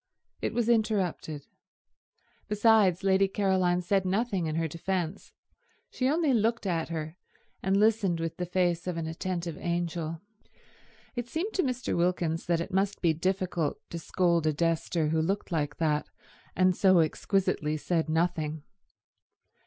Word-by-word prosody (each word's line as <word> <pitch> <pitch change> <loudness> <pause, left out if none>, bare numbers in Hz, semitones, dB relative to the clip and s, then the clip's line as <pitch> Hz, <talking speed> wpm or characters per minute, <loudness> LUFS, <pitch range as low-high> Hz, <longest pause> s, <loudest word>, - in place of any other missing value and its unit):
It - - -2
was 235 -1 +1
interrupted. 200 -10 0 1.0
Besides, 210 -4 +4
Lady 195 0 +4
Caroline 190 -3 +1
said 195 +2 +2
nothing 195 -2 0
in 155 - -2
her 165 0 0
defence; 175 +2 -3 0.6
she 255 0 0
only 310 -2 +2
looked 230 0 +1
at 165 -4 -1
her, 160 0 -5 0.4
and 190 +1 +2
listened 205 -5 +2
with 165 -1 -3
the 180 - -3
face 175 -1 0
of 180 -2 -2
an 165 - -2
attentive 170 0 -4
angel. 170 -2 -2 1.0
It 240 -1 -3
seemed 360 - -2
to 380 - +2
Mr. 255 -4 -2
Wilkins 170 -2 0
that 170 -1 +2
it 185 - -6
must 195 +1 +1
be 165 -2 +4
difficult 180 -2 -1
to 170 - -4
scold 170 -1 +1
a 155 - +2
Dester 165 0 0
who 160 0 +1
looked 195 +4 -2
like 150 -3 -1
that 150 -2 0 0.5
and 185 -1 +3
so 185 -1 +5
exquisitely 155 -2 0
said 165 +1 -1
nothing. 160 -2 0
180 Hz, 145 wpm, -29 LUFS, 165-195 Hz, 1.0 s, so